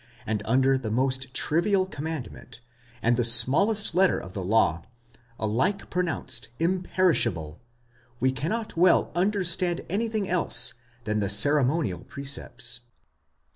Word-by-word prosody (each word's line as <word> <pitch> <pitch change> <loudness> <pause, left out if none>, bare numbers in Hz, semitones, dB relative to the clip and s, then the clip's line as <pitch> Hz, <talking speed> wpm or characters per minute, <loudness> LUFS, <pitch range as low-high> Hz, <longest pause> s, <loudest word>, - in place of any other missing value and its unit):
and 110 -2 -2
under 130 +3 +2
the 115 -4 -5
most 130 +2 -1
trivial 180 +9 +1
commandment, 155 -8 -7 0.4
and 120 +1 +2
the 120 - +1
smallest 195 - +4
letter 185 +2 +3
of 95 - -9
the 95 - -5
law, 90 -5 +1 0.5
alike 130 - -2
pronounced 130 -10 -2
imperishable, 165 - 0 0.6
we 130 +1 +1
cannot 170 - -4
well 175 +1 +3
understand 180 -2 0
anything 215 0 -2
else 130 -8 +2 0.3
than 105 -2 -2
the 100 -2 -1
ceremonial 130 - +3
precepts." 135 -4 -4
135 Hz, 115 wpm, -25 LUFS, 115-180 Hz, 0.6 s, smallest